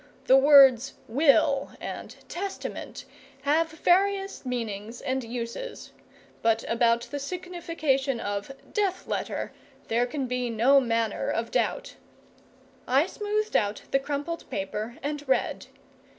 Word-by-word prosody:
The 260 - +6
words 270 -2 +7
"will" 275 +1 +3
and - - -7
"testament" 390 +2 -6 0.4
have 315 +3 +2
various 390 +4 +1
meanings 230 -3 -4
and 260 0 -2
uses; 235 - -6 0.5
but 225 0 +2
about 230 0 +3
the 285 - -5
signification 315 -5 -2
of 205 +3 -3 0.2
"death 395 -3 0
letter" - - -3 0.4
there 235 +2 +2
can 270 +1 -3
be 250 -1 -2
no 240 +5 +5
manner 230 -3 0
of 230 0 -2
doubt. - - -1 0.9
I 270 +5 +4
smoothed 425 +2 -2
out 205 0 +1
the 275 - +4
crumpled 290 +4 -4
paper 210 +4 -4
and 295 0 -3
read. 265 - 0
270 Hz, 120 wpm, -27 LUFS, 230-320 Hz, 0.9 s, words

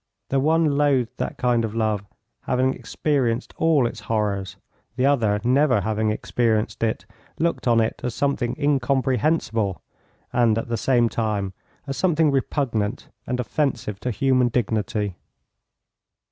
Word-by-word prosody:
The 135 - +2
one 155 0 +2
loathed 130 -4 +1
that - - -3
kind 120 -2 +2
of 110 -1 -3
love, 110 -3 0 0.4
having 130 +1 +1
experienced 130 -5 -1
all 160 -5 +3
its 120 - -3
horrors, 105 -3 -2 0.4
the 130 - +1
other, 115 -7 +2
never 130 -2 +3
having 110 +2 0
experienced 110 0 0
it, 110 -1 -1 0.3
looked 165 -4 -1
on 115 -1 +4
it 110 0 -1
as 125 -2 -2
something 135 -4 0
incomprehensible 135 - +1 0.5
and 120 -3 +3
at 115 - -3
the 115 - 0
same 120 0 +2
time 105 -4 -2 0.3
as 135 -1 -4
something 160 -2 +3
repugnant 130 -5 -1 0.2
and 125 0 -2
offensive 125 -6 -1
to 125 - -3
human 130 +1 +2
dignity. 105 -4 -1
120 Hz, 135 wpm, -23 LUFS, 110-135 Hz, 0.5 s, on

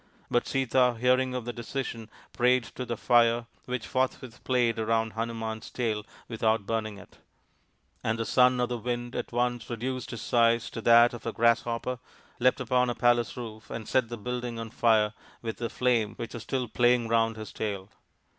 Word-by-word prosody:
But 120 - +2
Sita, 130 -2 +2
hearing 130 +1 +2
of 125 -2 -3
the 120 - -4
decision, 120 -1 -5 0.2
prayed 125 0 +3
to 125 - -5
the 120 -1 -3
Fire, 120 0 +3 0.2
which 125 -2 -3
forthwith 130 -2 -2
played 120 -3 +1
round 115 0 0
Hanuman's 115 -1 -4
tail 110 -4 -2 0.2
with 115 -2 -7
out 110 -2 +2
burning 110 -1 -2
it; 100 - -15 0.8
and 110 0 0
the 115 - -2
Son 125 0 +4
of 125 0 +1
the 120 -1 -3
Wind 120 +1 -3
at - - -4
once 120 -1 -1
reduced 125 +1 -3
his 115 -2 -6
size 115 -1 +2
to 115 - -5
that 120 +1 +6
of 120 - -7
a - - 0
grasshopper, 115 +2 +1 0.4
leapt 125 +2 +3
upon 125 0 +2
a 120 - -2
palace 120 -2 +2
roof 110 -3 -8
and 110 -2 -6
set 125 -3 +1
the 120 - -5
building 120 +1 -4
on 115 -1 -6
fire 110 -3 +3 0.3
with 115 -1 -4
the 120 -1 -3
flame, 120 -4 +1
which 115 - -6
was 120 - -6
still 125 +1 -2
playing 120 +1 +3
round 115 0 +2
his 110 -1 -8
tail. 100 -3 -3
120 Hz, 185 wpm, -28 LUFS, 115-125 Hz, 0.8 s, that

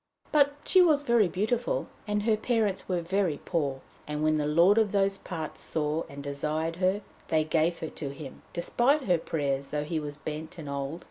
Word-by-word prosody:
But 285 -1 +4
she 375 - +6
was 305 -5 +4
very 235 -6 +4
beautiful, 220 +7 -1 0.2
and 210 0 0
her 220 0 +3
parents 215 -4 0
were 180 -2 +1
very 180 -4 0
poor. 140 -6 -1 0.3
And 150 0 -2
when 155 0 +3
the 150 -1 0
lord 170 +8 +5
of 215 -3 +2
those 195 -1 +2
parts 160 -4 -5
saw 155 +1 -1
and 140 0 -8
desired 155 +3 -2
her, 190 +2 +1 0.3
they 155 -1 +2
gave 160 +2 +1
her 160 - -3
to 140 - -5
him, 140 -1 -9
despite 250 - +2
her 180 -6 +2
prayers, 140 -4 -2
though 150 0 -2
he 155 +1 -2
was 145 -1 -6
bent 155 +4 -6
and 155 -3 -7
old. 140 +3 -3
165 Hz, 195 wpm, -28 LUFS, 150-205 Hz, 0.3 s, she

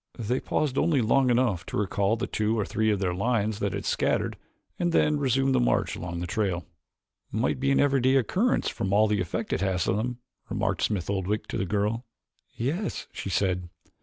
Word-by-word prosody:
They 120 +3 -1
paused 145 -3 0
only 155 -4 +3
long 125 +3 +3
enough 120 -7 +2
to - - -3
recall 100 +1 +1
the 115 - -2
two 110 +1 0
or 105 - 0
three 110 +1 0
of 105 - +2
their 95 -2 -1
lions 110 +1 0
that 100 -2 -1
had 100 - -4
scattered - - 0 0.4
and 175 0 +1
then 150 -2 +3
resumed 135 0 +2
the - - +3
march - - +1
along 85 0 -5
the - - -2
trail. 90 -3 -1 0.7
"Might 115 +4 0
be 135 +1 +1
an 135 - +3
everyday 135 -2 +3
occurrence 185 - +2
from 95 0 -2
all 105 +2 +5
the 105 -2 +1
effect 85 - -3
it - - -1
has 95 -2 0
on 95 - +2
them," 120 +2 -2 0.3
remarked 100 -3 -1
Smith 95 -6 0
Oldwick 100 +1 -1
to - - -2
the 95 - -1
girl. 105 +4 0 0.5
"Yes," 155 - -2
she - - -5
said. 90 -1 0
105 Hz, 200 wpm, -27 LUFS, 95-130 Hz, 0.7 s, all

